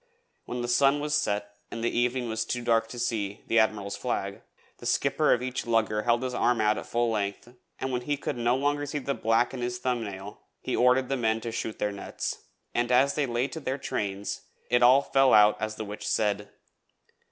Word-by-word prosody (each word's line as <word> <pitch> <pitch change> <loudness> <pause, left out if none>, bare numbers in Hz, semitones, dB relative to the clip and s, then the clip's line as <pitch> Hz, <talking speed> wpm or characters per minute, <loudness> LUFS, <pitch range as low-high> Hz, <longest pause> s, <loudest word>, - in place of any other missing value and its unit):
When 125 - -4
the - - -2
sun 135 +4 +4
was 150 0 -2
set 105 -7 -1
and 115 - -6
the 120 - 0
evening 125 +1 +1
was 110 0 -1
too 120 +2 -3
dark 115 -1 +2
to 120 - -9
see 110 -4 -2
the 115 - +3
Admiral's 105 -2 0
Flag, - - -3 0.4
the - - -6
skipper 140 +2 +2
of 125 - +2
each 130 -1 -3
lugger 110 -2 +1
held 120 +2 +1
his 130 -1 -2
arm 120 -1 +2
out 105 0 +2
at - - -9
full 120 0 +1
length, 105 +3 -3 0.2
and 130 - -3
when 125 -1 -1
he 145 +3 -1
could - - -3
no 120 +1 +1
longer 145 +2 0
see 145 - -3
the 140 0 -2
black 115 +1 +1
in 130 - -5
his 120 0 -2
thumb 125 -1 -1
nail 100 0 -8 0.2
he - - -1
ordered 125 +1 +4
the 135 - -1
men 110 -2 +1
to 115 - -4
shoot 110 -1 -4
their 105 - -1
nets. 100 - -5 0.3
And 120 +1 0
as 135 +3 +4
they 145 -2 0
lay 120 +2 0
to 160 - -6
their 135 -2 -2
trains 100 -7 -3 0.3
it 120 - +4
all 130 +3 +6
fell 135 -1 +4
out 105 0 +6
as 110 0 -2
the 110 - -5
witch 105 +1 -8
had - - -1
said. 105 -2 0
120 Hz, 225 wpm, -27 LUFS, 110-130 Hz, 0.4 s, all